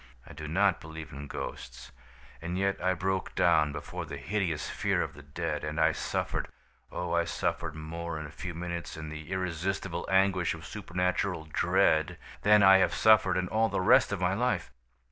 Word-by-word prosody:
"I - - -12
do 75 +1 -7
not 95 +4 +2
believe 80 -1 -8
in 70 +1 -7
ghosts; 60 -3 -7 0.5
and 85 +2 -3
yet 100 0 0
I 95 0 +2
broke 95 +2 -2
down 80 -4 +4
before - - -6
the - - -7
hideous 90 -8 -2
fear - - 0
of - - -6
the 75 - -12
dead; 70 0 -4
and 75 +1 -3
I 80 0 +5
suffered, - - -2 0.4
oh, 90 -1 -3
I 85 0 +3
suffered 85 -1 -2
more 80 +1 -5
in 80 - -6
a 75 - -9
few 90 +1 -6
minutes, 85 -1 -5
in 80 -1 -6
the 75 +1 -8
irresistible 90 0 -2
anguish 95 -2 +2
of - - -11
supernatural 90 -1 -2
dread, 80 +3 +2 0.2
than 105 0 +6
I 95 0 +8
have - - +2
suffered 110 -4 +5
in 90 0 0
all 110 +1 +2
the - - -1
rest 90 - +5
of 100 - -2
my 90 0 +1
life! 120 - 0
85 Hz, 185 wpm, -29 LUFS, 80-95 Hz, 0.5 s, I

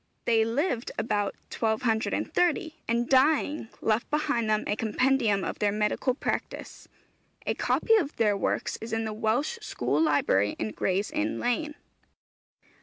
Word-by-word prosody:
They 225 -2 +4
lived 245 +2 -1
about 205 -2 -1 0.2
1230, 240 - 0
and 235 +1 0
dying, 290 0 +3
left 220 +1 0
behind 290 -7 0
them 215 0 +2
a 205 - 0
compendium 225 -2 +1
of - - -4
their 205 -1 +2
medical 210 +5 0
practice. - - -4 0.6
'A - - +1
copy 450 - +1
of 300 -8 -1
their 210 -3 +2
works 200 - -1
is 225 +1 -6
in 225 0 0
the 220 - -3
Welsh 230 - 0
School 140 - -1
Library 125 -10 +2
in 110 - -3
Gray's 195 - -1
Inn 310 0 -1
Lane.' 295 +5 -1
225 Hz, 140 wpm, -27 LUFS, 210-285 Hz, 0.6 s, They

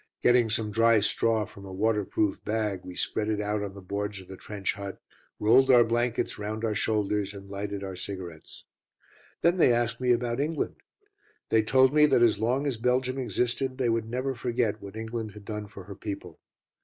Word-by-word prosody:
Getting 120 -2 +5
some 110 -1 0
dry 115 +1 +4
straw 110 +1 +1
from 100 - -13
a 95 - -9
waterproof 105 0 0
bag, 105 -3 -1
we 90 - -9
spread 105 +3 -1
it 105 -1 0
out 105 0 -1
on 100 -1 -5
the 100 - -10
boards 100 +2 -3
of 95 - -12
the 95 - -8
trench 100 0 -3
hut, 100 -2 -7 0.4
rolled 125 +5 +5
our 120 -2 +8
blankets 120 0 -1
round 110 +2 -3
our 110 - 0
shoulders, 105 -1 0
and 100 0 -10
lighted 100 0 -4
our 95 -1 -5
cigarettes. 90 -4 -7 0.8
Then 170 +2 +4
they 160 - +5
asked 120 +1 0
me 125 -1 +3
about 120 0 +1
England. 150 +2 -1 0.7
They 110 - +4
told 130 +4 +4
me 150 0 +6
that 120 - +4
as 110 -3 +4
long 125 +6 +1
as 135 -5 -1
Belgium 125 +2 0
existed 125 +2 -1
they 125 -3 +1
would 115 -1 0
never 130 +3 -1
forget 120 -3 -1
what 100 +1 -9
England 110 -1 -4
had 105 -1 -12
done 105 -1 -5
for 100 -1 -10
her 100 +1 -9
people. 100 +1 -7
110 Hz, 195 wpm, -28 LUFS, 100-120 Hz, 0.8 s, our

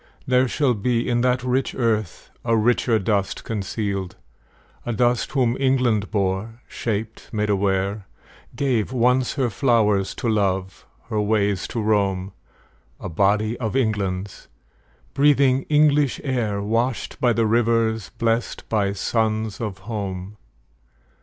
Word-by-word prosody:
There 130 0 +3
shall 135 0 +1
be 115 +2 0
In 120 -1 +1
that 125 0 +1
rich 130 +1 0
earth 110 -6 -1
a 115 -1 +2
richer 115 +1 +2
dust 100 -1 -1
concealed; 100 -3 -3 0.7
A 120 - -3
dust 120 +4 +1
whom 125 -4 +2
England 125 -6 +2
bore, 100 +2 -2
shaped, 110 0 -4
made 105 -1 0
aware, 100 0 0 0.5
Gave, 125 -6 0
once, 125 0 +2
her 125 -4 0
flowers 105 -4 +2
to - - -3
love, 95 -4 -1 0.2
her 110 -2 0
ways 105 -2 +1
to 115 - -4
roam, 100 -3 0 0.7
A - - -6
body 105 +6 +1
of 110 -1 -3
England's, 100 -6 -2 0.7
breathing 140 -2 +3
English 150 -2 +3
air, 110 -7 -1
Washed 115 +4 -1
by 125 - +4
the 115 -1 +1
rivers, 115 -1 +1
blest 115 +1 -1
by 100 -3 +1
suns 110 +1 -1
of 105 -4 -4
home. 100 -2 -5
110 Hz, 125 wpm, -22 LUFS, 100-125 Hz, 0.7 s, by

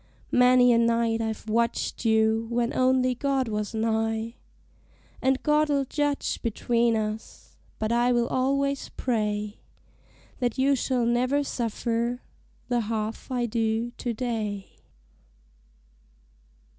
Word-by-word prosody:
Many 250 0 +6
a 230 - +4
night 230 -1 +2
I've 220 0 -4
watched 230 +2 -1
you 220 0 +3
when 235 0 0
only 255 0 +3
God 270 0 0
was 210 0 -3
nigh; 225 0 -1 0.9
And 265 0 +1
God'll 300 -2 +2
judge 290 +1 -1
between 235 0 +1
us; 215 0 -5 0.2
but 220 +1 -2
I 240 +1 +3
will 240 -1 +2
al'ays 275 +1 0
pray 210 -3 -1 0.8
That 245 -2 -1
you 275 +1 +3
shall 255 -2 0
never 250 +4 +2
suffer 235 0 -2 0.4
the 245 -1 +1
half 220 +1 -3
I 245 -1 0
do 225 0 -1
to 245 - -2
day. 220 -4 -3
235 Hz, 115 wpm, -26 LUFS, 225-255 Hz, 0.9 s, Many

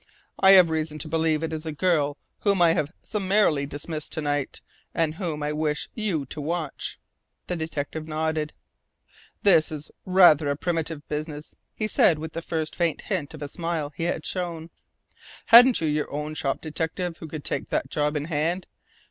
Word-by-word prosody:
"I 190 0 +8
have 180 -4 +7
reason 155 -1 -2
to 155 - -4
believe 160 0 +1
it 160 - -2
is 155 -1 -4
a 160 - -4
girl 150 -3 +1 0.2
whom 200 -2 +2
I 170 -2 +6
have 150 -1 -1
summarily 190 -8 +1
dismissed 150 +2 -6
to 160 - -2
night, 145 -2 -2 0.3
and 160 -2 +1
whom 160 -4 -4
I 150 0 -1
wish 150 -1 -1
you 195 -10 -1
to 150 +3 -7
watch." 160 -1 -3 0.5
The 180 - -2
detective 160 -1 -4
nodded. 155 -1 -1 0.9
"This 165 -7 +5
is 150 -1 -7
rather 175 -6 +6
a 140 - +1
primitive 160 -2 -2
business," 150 0 -5 0.2
he 215 - -1
said 170 -6 +4
with 160 +1 -6
the 165 - -4
first 160 -2 -3
faint 170 -3 0
hint 160 -6 -3
of 150 - -7
a - - -3
smile 165 -1 -3
he 165 - -2
had 170 -2 -2
shown. 170 -3 -4 0.7
"Haven't 245 -1 +8
you 160 - +1
your 150 0 -1
own 150 +1 -3
shop 135 -3 -2
detective 165 +2 -3
who 160 - -8
could 155 -1 -7
take - - -3
that - - -1
job 150 0 0
in 145 - -3
hand? 165 +3 -1
160 Hz, 180 wpm, -25 LUFS, 150-170 Hz, 0.9 s, I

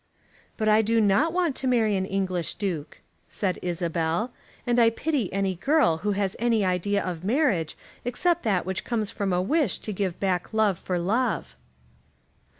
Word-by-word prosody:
"But 215 - 0
I 215 +1 +5
do 225 +1 +2
not 215 +10 +3
want 345 -5 0
to 265 - -2
marry 225 -5 +3
an 190 0 -1
English 185 -4 -2
Duke," 175 -7 -4 0.3
said 190 -3 -2
Isabel, 170 +4 -1 0.3
"and 245 0 +2
I 230 -1 +6
pity 265 - -1
any 195 0 0
girl 265 - +2
who 205 +4 -1
has 195 -1 -1
any 230 -3 +2
idea 185 +3 0
of 175 -2 -4
marriage 205 - +1 0.3
except 340 +8 +1
that 195 -5 0
which 190 0 -3
comes 220 -4 -2
from 200 -3 -2
a 180 0 +1
wish 300 - +1
to 215 - -5
give 185 -2 -2
back 185 +1 -1
love 215 -5 +2
for 180 - -2
love." 195 - -1
200 Hz, 170 wpm, -26 LUFS, 180-235 Hz, 0.3 s, I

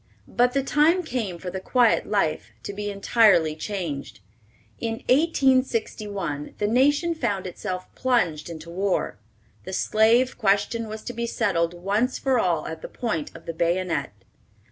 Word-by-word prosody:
But 245 +1 +2
the 275 -1 +1
time 315 +6 +3
came 230 - -3
for 180 +1 -6
the 190 - -4
quiet 240 +4 +2
life 155 - 0
to 200 - -5
be 205 +1 -4
entirely 200 -6 +3
changed. 160 - -5 0.6
In 225 -1 -2
1861 240 - +1
the 205 - -1
nation 285 +9 +3
found 210 - -2
itself 185 0 -5
plunged 180 -13 0
into 165 0 -8
war. 185 - -1 0.4
The 190 - -7
slave 230 +7 +3
question 205 +2 +1
was 215 0 -7
to 245 - -5
be 235 0 -3
settled 175 -7 0
once 205 +8 0
for 265 -2 +1
all 170 -6 +1
at 160 0 -6
the - - -7
point 190 -11 -3
of 165 - -12
the 165 - -4
bayonet. 170 -2 0
205 Hz, 150 wpm, -24 LUFS, 175-245 Hz, 0.6 s, time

